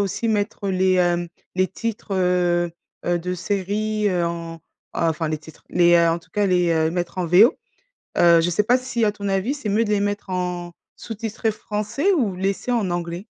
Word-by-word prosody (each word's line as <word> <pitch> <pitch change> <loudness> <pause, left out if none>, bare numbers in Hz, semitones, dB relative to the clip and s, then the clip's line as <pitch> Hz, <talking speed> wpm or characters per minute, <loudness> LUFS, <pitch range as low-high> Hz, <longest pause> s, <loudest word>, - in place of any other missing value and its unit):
aussi 200 +3 -1
mettre 205 -1 -1
les, 185 0 +2
hem, 175 -1 +1 0.3
les 185 0 +2
titres, 210 +1 -4
heu, 175 -2 +2 0.4
heu, 175 0 +2
de 180 +2 -4
séries, 205 +3 -1
heu, 175 -2 +1
en 165 -1 -5 0.3
enfin 165 -1 0
les 155 - -2
titres, 155 0 -16
les 175 -1 +4
heu, 170 -1 +5
en 165 - 0
tout 165 - -24
cas 205 +2 0
les, 180 -2 +2
heu, 160 -1 +2
mettre 175 0 -3
en 180 - -1
V.O. 185 +9 +6 0.6
Heu, 170 -1 +6
je 175 - +1
sais 195 +5 +1
pas 245 +4 +4
si, 250 -2 -2
à 210 - +3
ton 200 -1 -6
avis, 195 +7 0
c'est 280 -7 -6
mieux 220 +3 +2
de 210 - -4
les 205 -1 +2
mettre 205 -1 -2
en 180 -1 -3 0.2
sous-titrés 225 0 -3
français 215 - -2
ou 225 - 0
laisser 195 +6 -1
en 220 -6 +1
anglais? 175 +2 -4
185 Hz, 200 wpm, -22 LUFS, 175-210 Hz, 0.6 s, V.O